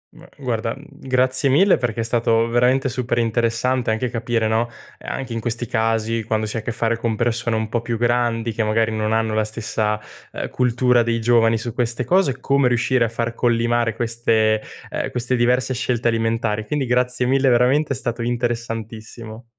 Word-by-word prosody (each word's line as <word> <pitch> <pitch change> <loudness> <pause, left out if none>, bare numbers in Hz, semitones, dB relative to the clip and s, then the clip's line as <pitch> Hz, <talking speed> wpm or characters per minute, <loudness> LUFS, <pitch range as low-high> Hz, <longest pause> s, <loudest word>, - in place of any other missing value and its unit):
M - - -15
guarda, - - -2
mhmm, - - -14 0.2
grazie 130 +1 +2
mille 185 +9 +5
perché 115 -2 -2
è - - -1
stato 115 0 +2
veramente 125 +3 +2
super 125 -1 -2
interessante 120 +2 0
anche 110 +3 0
capire, 115 -1 -1
no, 115 +2 0 0.3
ehm, - - -8
anche 130 -3 -4
in 115 - -2
questi 120 +1 -3
casi 115 0 0
quando 110 0 -1
si 105 - -5
ha - - 0
a - - -6
che 115 - -4
fare 115 0 0
con 115 -1 -1
persone 115 0 0
un 110 0 -1
po' 115 +1 -2
più 115 0 -3
grandi 120 -1 0
che 110 - -1
magari 110 +1 +1
non 110 0 -1
hanno 110 0 +1
la 110 0 +2
stessa, 110 0 -2 0.3
ehm, - - -5
cultura 125 0 +2
dei 115 0 0
giovani 115 -1 +3
su 115 +1 -5
queste 120 0 -1
cose, 155 -4 +2
come 140 0 +2
riuscire 120 0 +2
a - - -2
far 115 +1 -3
collimare 120 -1 +1
queste 115 -2 +1 0.3
ehm, - - -2
queste 125 +1 -1
diverse 125 +2 +1
scelte 120 -1 0
alimentari, 115 -1 -1
quindi 145 +3 -1
grazie 125 +1 +1
mille 135 +1 +3
veramente 130 +5 +3
è - - -4
stato 120 -2 -3
interessantissimo. 115 -1 -4
115 Hz, 190 wpm, -21 LUFS, 115-125 Hz, 0.3 s, mille